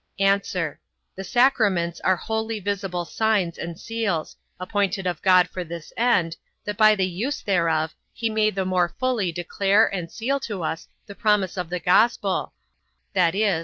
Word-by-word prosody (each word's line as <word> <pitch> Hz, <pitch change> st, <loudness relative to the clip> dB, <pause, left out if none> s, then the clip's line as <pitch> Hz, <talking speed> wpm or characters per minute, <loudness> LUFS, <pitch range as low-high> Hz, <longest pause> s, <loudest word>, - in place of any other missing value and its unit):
A. 195 Hz, 0 st, +4 dB, 0.7 s
The 195 Hz, -, -6 dB
sacraments 205 Hz, -9 st, +2 dB
are 185 Hz, -, +3 dB
holy 220 Hz, +3 st, -3 dB
visible 195 Hz, -3 st, -3 dB
signs 205 Hz, -3 st, 0 dB
and 170 Hz, 0 st, -6 dB
seals, 220 Hz, -8 st, -2 dB, 0.2 s
appointed 195 Hz, 0 st, -1 dB
of 175 Hz, -3 st, -2 dB
God 185 Hz, -2 st, +5 dB
for 180 Hz, -, -5 dB
this 170 Hz, -1 st, -9 dB
end, 180 Hz, -9 st, +2 dB, 0.3 s
that 210 Hz, -, -3 dB
by 215 Hz, 0 st, +6 dB
the 190 Hz, -2 st, +1 dB
use 225 Hz, +12 st, -3 dB
thereof, 165 Hz, -4 st, +1 dB, 0.2 s
he 230 Hz, -, -2 dB
may 215 Hz, -1 st, +2 dB
the 190 Hz, -2 st, -2 dB
more 180 Hz, -2 st, +1 dB
fully 245 Hz, -8 st, 0 dB
declare 195 Hz, +5 st, +2 dB
and 175 Hz, -3 st, -4 dB
seal 275 Hz, +5 st, -1 dB
to 205 Hz, -9 st, -5 dB
us 160 Hz, +1 st, -3 dB, 0.2 s
the 200 Hz, -, -9 dB
promise 205 Hz, -3 st, +1 dB
of 180 Hz, -3 st, -4 dB
the 180 Hz, 0 st, -2 dB
gospel, 195 Hz, +3 st, +2 dB, 0.6 s
viz. 190 Hz, 0 st, +2 dB
195 Hz, 160 wpm, -24 LUFS, 175-215 Hz, 0.7 s, by